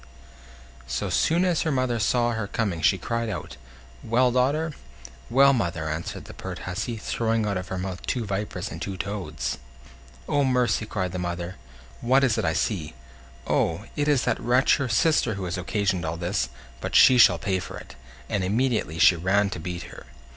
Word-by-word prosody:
So 70 - -2
soon 170 +3 +2
as 175 -3 +1
her 160 - 0
mother 130 -3 0
saw 120 +3 +2
her 110 -3 -3
coming 100 -7 -2
she 90 +5 +4
cried 115 +4 -2
out: 100 - -6 0.5
"Well, 125 +2 +3
daughter?" 145 +6 +1 0.6
"Well, 140 +2 +6
mother?" 85 -9 -1
answered 80 +2 -4
the - - -10
pert - - -7
hussy, 110 +6 -3
throwing 115 +1 -1
out 100 -1 -1
of 95 0 -4
her 95 - -4
mouth 95 0 -5
two 120 -3 -1
vipers 100 -1 -3
and - - -7
two 95 -1 -4
toads. 80 -12 -4 0.7
"Oh! 145 -1 +2
mercy," 125 -5 +1
cried 95 -4 -2
the 90 - -4
mother; 85 +1 -4 0.4
"what 130 +3 +3
is 125 -5 +3
it 110 - -1
I 80 - +1
see? 80 -5 -2 0.5
Oh! - - 0
it 145 0 0
is 145 -4 +3
that - - 0
wretch 125 +3 +3
her 140 -3 -2
sister 115 -1 +2
who 95 -1 -4
has 90 +1 -3
occasioned 95 0 -1
all 80 +1 -3
this; 85 -7 -1 0.3
but - - -4
she 125 -1 +7
shall 90 -6 +7
pay 95 +2 -1
for - - -7
it"; - - -12 0.3
and 100 +6 -1
immediately 110 - 0
she 85 - +6
ran 100 +4 +1
to 90 - -5
beat 85 +1 -5
her. - - -12
105 Hz, 190 wpm, -25 LUFS, 90-125 Hz, 0.7 s, she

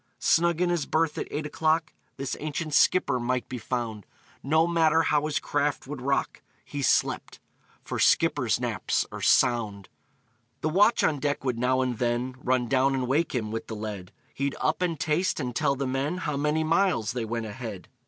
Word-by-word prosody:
Snug 170 0 +2
in 180 -1 +2
his 170 -4 -1
berth, 160 -1 0
at - - -3
eight 150 +1 -3
o'clock, 155 +1 0 0.2
This 135 -1 -3
ancient 155 +1 -4
skipper 140 -5 +3
might 125 -1 -1
be 125 - -5
found; 110 -3 -4 0.3
No 160 +4 +3
matter 165 -1 +3
how 150 -1 +1
his 155 - -1
craft 145 0 -1
would 135 -1 -7
rock, 140 +1 -1 0.2
He 145 - -5
slept - - +1 0.4
for - - -4
skippers' - - +3
naps - - -1
are - - -7
sound! 105 -5 +2 0.7
The 155 - 0
watch 205 +8 +4
on 150 -3 +2
deck 145 0 -1
would 125 -3 -1
now 130 +1 +2
and 125 -3 -2
then 120 +1 -1
Run 125 -1 +1
down 135 +2 +2
and 130 -1 -1
wake 145 +3 +1
him, 110 -3 -2
with 115 - -4
the 110 - -5
lead; 105 -4 -6 0.2
He'd 140 0 -2
up, - - 0
and 170 -4 -1
taste, 160 +5 0
and 125 -4 -3
tell 140 -1 +1
the 140 0 -2
men 135 +6 -1
How 150 -5 -3
many 150 +2 +1
miles 160 - +1
they 125 -2 -3
went 115 0 -3
ahead. 110 -3 -7
140 Hz, 190 wpm, -27 LUFS, 125-155 Hz, 0.7 s, watch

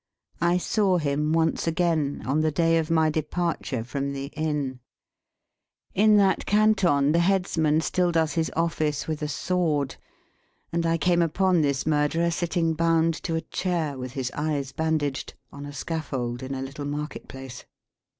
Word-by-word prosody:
I 170 +1 +3
saw 190 0 +2
him 150 -1 0
once 165 +1 +1
again, 165 -4 0
on 145 +4 +1
the 155 - +2
day 165 +2 +2
of 160 0 -3
my 160 -1 +3
departure 155 -5 -2
from 140 +3 -3
the 140 0 -5
Inn. 150 -4 -2 1.1
In 210 +2 +5
that 195 -2 +2
Canton 195 -9 +3
the 170 - +3
headsman 170 -4 +2
still 175 +2 +1
does 160 -3 +1
his 165 -1 0
office 155 -3 0
with 155 -1 -3
a 150 - -1
sword; 150 -2 -1 0.8
and 170 0 +1
I 165 0 +2
came 175 +2 +2
upon 180 +1 +2
this 140 -2 0
murderer 155 +3 +1
sitting 165 0 0
bound, 165 0 +2
to 165 - -2
a 160 - 0
chair, 170 -7 -2
with 130 -1 -6
his 130 -2 -3
eyes 145 -3 -2
bandaged, 155 -3 -2 0.2
on 145 0 -8
a - - -7
scaffold 135 -5 -4
in 130 +1 -4
a 130 - -4
little 140 +2 -6
market 150 +1 -5
place. 135 -2 -9
155 Hz, 160 wpm, -25 LUFS, 145-170 Hz, 1.1 s, In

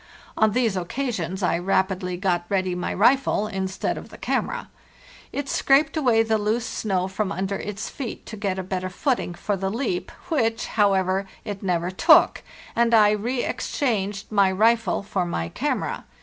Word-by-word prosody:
On 220 -1 +3
these 235 -4 +1
occasions 190 -2 -3
I 170 - +2
rapidly 190 0 0
got 175 -2 0
ready 185 -2 0
my 180 0 -3
rifle 240 0 +3
instead 190 -2 -2
of - - -12
the - - -12
camera. - - -2 0.6
It 285 -1 -3
scraped 280 +4 +3
away 245 -7 +3
the 220 -1 +1
loose 220 +3 0
snow 190 -6 -1
from 190 +1 -2
under 195 +1 -2
its 205 0 -5
feet 255 -5 -6
to 220 - -7
get 200 -3 -2
a 190 - -3
better 185 0 -3
footing 215 -3 -1
for 205 +3 -2
the 190 0 -2
leap 220 -4 -2 0.2
which, 230 -8 +1
however, 195 -2 +1 0.2
it 205 -3 -5
never 180 -2 0
took; 185 - +5 0.3
and 235 0 +4
I 210 -1 +6
reexchanged 215 -2 -1
my 200 -2 +4
rifle 220 0 +2
for 200 -2 -1
my 85 - -3
camera. - - -2
200 Hz, 165 wpm, -24 LUFS, 185-225 Hz, 0.6 s, I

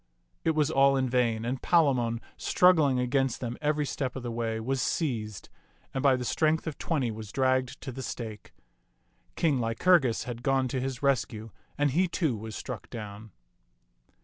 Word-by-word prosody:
It 160 - +1
was 155 0 +2
all 135 -1 +4
in 130 -1 +1
vain, 120 -3 +1
and 125 +2 -2
Palamon, 125 -9 +2
struggling 160 -8 +4
against 135 0 0
them 120 -1 -4
every 150 0 +1
step 135 -2 -3
of 130 - -5
the 120 - -3
way, 115 -1 -2
was 130 +3 -1
seized, 110 - -2 0.5
and 135 - -1
by 135 -1 +5
the 125 -1 -4
strength 155 +4 +1
of 160 -3 -5
twenty 135 -8 0
was 110 -2 -8
dragged 130 -1 +1
to 135 - -5
the 130 +2 -7
stake. 110 -5 -6 0.8
King 150 -6 +2
Lycurgus 120 +2 +3
had 120 -1 -6
gone 135 0 +1
to 130 +1 -2
his 135 0 -4
rescue, 115 -5 0 0.3
and 145 -1 +2
he, 180 +7 +2
too, 160 -6 0
was 110 0 -7
struck 125 -6 -7
down. 105 -1 -8
130 Hz, 175 wpm, -28 LUFS, 115-140 Hz, 0.8 s, by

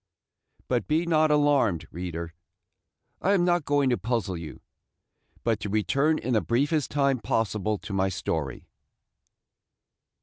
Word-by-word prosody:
But 120 -3 0
be 160 +3 +1
not 155 -2 +3
alarmed, 140 - +2
reader; 85 -1 -5 0.9
I 195 - +3
am 180 -3 +3
not 175 -3 +2
going 145 -2 +2
to 120 - +1
puzzle 115 -5 -1
you, 80 -2 -8 0.8
but 115 -3 +1
to 105 - -4
return 135 - +2
in 125 - -2
the 110 - +3
briefest 145 +5 0
time 140 -3 +1
possible 110 -1 -1
to 100 - -8
my 95 0 +1
story. 80 -7 -3
120 Hz, 135 wpm, -26 LUFS, 95-145 Hz, 0.9 s, not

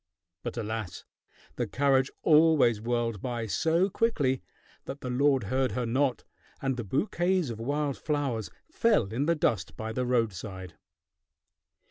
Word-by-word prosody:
But - - -5
alas! 110 -4 -4 0.5
The - - -1
carriage 135 -1 +2
always 150 -8 +5
whirled 115 -3 -1
by 120 -3 -3
so 165 - +2
quickly 160 - +1 0.4
that 140 +1 -7
the 125 - -4
lord 135 0 +3
heard 130 +5 0
her 125 -1 -1
not, 130 +2 0 0.4
and 135 -1 -1
the 120 - -4
bouquets 175 - 0
of 110 - -7
wild 140 +3 -1
flowers 140 -8 -1 0.2
fell 225 - +2
in 135 +6 0
the 170 - +3
dust 95 - -1
by 110 0 -4
the 125 +1 -1
roadside. 100 -6 -2
130 Hz, 140 wpm, -28 LUFS, 115-145 Hz, 0.5 s, always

